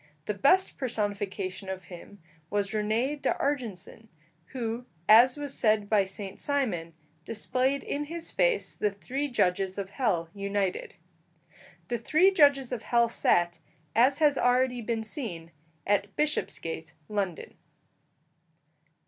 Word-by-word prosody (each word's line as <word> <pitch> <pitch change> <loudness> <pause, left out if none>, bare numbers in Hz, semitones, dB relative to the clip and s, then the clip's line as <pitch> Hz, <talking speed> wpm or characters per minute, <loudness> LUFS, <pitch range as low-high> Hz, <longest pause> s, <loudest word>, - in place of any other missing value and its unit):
The 210 - -1
best 325 - +3
personification 205 -5 -3
of 190 0 -5
him 175 +2 -12 0.3
was 205 -1 -1
René 225 +7 -1
d'Argenson, 225 -6 -2 0.4
who, 240 +1 -4 0.2
as 240 +5 +7
was 290 -2 -3
said 215 -2 +1
by 205 -3 +4
Saint 195 0 -7
Simon, 200 - -1 0.3
displayed 255 +6 -1
in 295 +1 -3
his 330 +2 -4
face - - +1
the 210 - 0
three 260 +8 -4
judges 190 -6 0
of 195 -1 -4
hell 200 -10 0
united. 200 -1 -2 0.9
The 240 -1 -2
three 320 - +4
judges 285 -7 +4
of 245 -3 -3
hell 235 -1 +2
sat, 175 -6 +2 0.4
as 255 +5 +4
has 295 -3 +3
already 250 0 +2
been 225 0 -2
seen, 200 - -6 0.3
at 200 0 0
Bishopsgate, 165 - -2
London. 195 -5 -3
220 Hz, 125 wpm, -28 LUFS, 195-265 Hz, 0.9 s, as